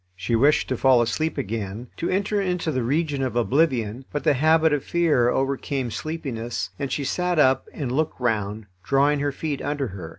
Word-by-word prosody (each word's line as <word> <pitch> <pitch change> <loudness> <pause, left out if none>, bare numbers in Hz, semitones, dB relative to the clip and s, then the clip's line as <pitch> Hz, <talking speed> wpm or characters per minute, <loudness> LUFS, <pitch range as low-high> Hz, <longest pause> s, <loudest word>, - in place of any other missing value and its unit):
She 100 +6 -1
wished 140 +6 +3
to 130 - -1
fall 130 -1 +5
asleep 155 +8 -2
again, 110 +2 -4
to 170 - -2
enter 200 +2 0
into 180 -4 -1
the 130 -3 -1
region 145 +3 0
of 130 -3 -2
oblivion, 125 -2 +1
but 145 - -3
the 150 - +4
habit 160 +3 +3
of 145 - 0
fear 155 -8 +2
overcame 135 -1 -1
sleepiness, 120 -6 -4
and 140 -3 -3
she 145 - -1
sat 180 +5 -1
up 130 -3 +3
and 135 -5 -4
looked 155 +2 -1
round, 110 -3 -1 0.2
drawing 140 +2 +2
her 145 0 0
feet 145 0 -4
under 145 -3 -2
her. 90 -4 -8
135 Hz, 190 wpm, -24 LUFS, 120-155 Hz, 0.2 s, fall